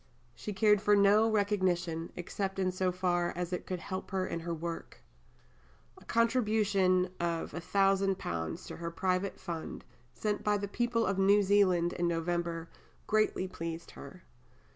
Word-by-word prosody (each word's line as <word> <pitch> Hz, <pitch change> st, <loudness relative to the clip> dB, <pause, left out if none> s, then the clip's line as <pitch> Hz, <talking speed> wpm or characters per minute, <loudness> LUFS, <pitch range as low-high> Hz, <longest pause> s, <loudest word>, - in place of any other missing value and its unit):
She 210 Hz, -, -6 dB
cared 210 Hz, 0 st, +4 dB
for 210 Hz, -1 st, +4 dB
no 205 Hz, +2 st, +5 dB
recognition, 185 Hz, -6 st, 0 dB
except 195 Hz, +2 st, -4 dB
in 185 Hz, -1 st, +1 dB
so 185 Hz, 0 st, 0 dB
far 175 Hz, -1 st, 0 dB
as 180 Hz, 0 st, -3 dB
it 180 Hz, -, -4 dB
could 185 Hz, -, -2 dB
help 185 Hz, +2 st, -5 dB
her 190 Hz, -1 st, -1 dB
in 170 Hz, -, -3 dB
her 170 Hz, +1 st, -5 dB
work. 165 Hz, 0 st, -6 dB, 1.0 s
A -, -, -19 dB
contribution 210 Hz, -6 st, +2 dB
of 170 Hz, -1 st, -2 dB
£1000 195 Hz, -, 0 dB
to -, -, -7 dB
her 170 Hz, 0 st, -4 dB
private 185 Hz, +2 st, -1 dB
fund, 170 Hz, -4 st, -6 dB, 0.3 s
sent 210 Hz, -1 st, -2 dB
by 210 Hz, 0 st, +2 dB
the 200 Hz, 0 st, -3 dB
people 230 Hz, +2 st, 0 dB
of 195 Hz, 0 st, 0 dB
New 200 Hz, +2 st, +5 dB
Zealand 185 Hz, -3 st, +3 dB
in 175 Hz, -, 0 dB
November, 170 Hz, 0 st, -2 dB, 0.4 s
greatly 215 Hz, -3 st, +1 dB
pleased 165 Hz, -2 st, -6 dB
her. 140 Hz, +6 st, -11 dB
185 Hz, 150 wpm, -31 LUFS, 170-205 Hz, 1.0 s, no